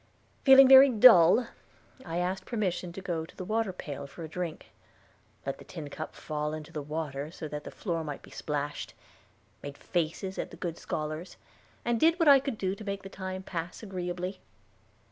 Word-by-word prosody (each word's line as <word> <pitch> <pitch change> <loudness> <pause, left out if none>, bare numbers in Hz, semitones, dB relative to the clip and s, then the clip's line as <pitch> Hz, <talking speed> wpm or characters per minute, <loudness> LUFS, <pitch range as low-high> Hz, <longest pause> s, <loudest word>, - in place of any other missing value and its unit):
Feeling 270 -1 +9
very 270 +1 +9
dull, 225 -3 +7 0.6
I 165 0 -4
asked 180 +2 -2
permission 185 -6 -2
to 195 - -7
go 170 -4 -2
to 160 - -13
the 185 - -6
water 220 0 0
pail 145 -6 -7
for 165 - -10
a - - -5
drink; 170 0 -6 0.7
let 135 - -4
the - - -11
tin 155 -5 -8
cup 155 - -7
fall 150 0 -3
into 155 +1 -9
the 150 - -3
water 150 -1 -4
so 160 -1 -7
that 150 0 -6
the - - -6
floor 170 -5 -3
might 145 -2 -6
be - - -15
splashed; 145 -1 -4 0.7
made 145 0 -8
faces 175 +3 -2
at - - -3
the - - -12
good 170 -2 -4
scholars, 155 +3 -5 0.5
and 235 -1 +1
did 330 +4 +4
what 330 -3 +2
I 280 -1 +9
could 265 -4 -4
to 195 +2 -2
make 200 -1 -4
the 195 - -8
time 190 -1 -6
pass 175 +2 -6
agreeably. 180 -1 -4
180 Hz, 185 wpm, -29 LUFS, 155-200 Hz, 0.7 s, Feeling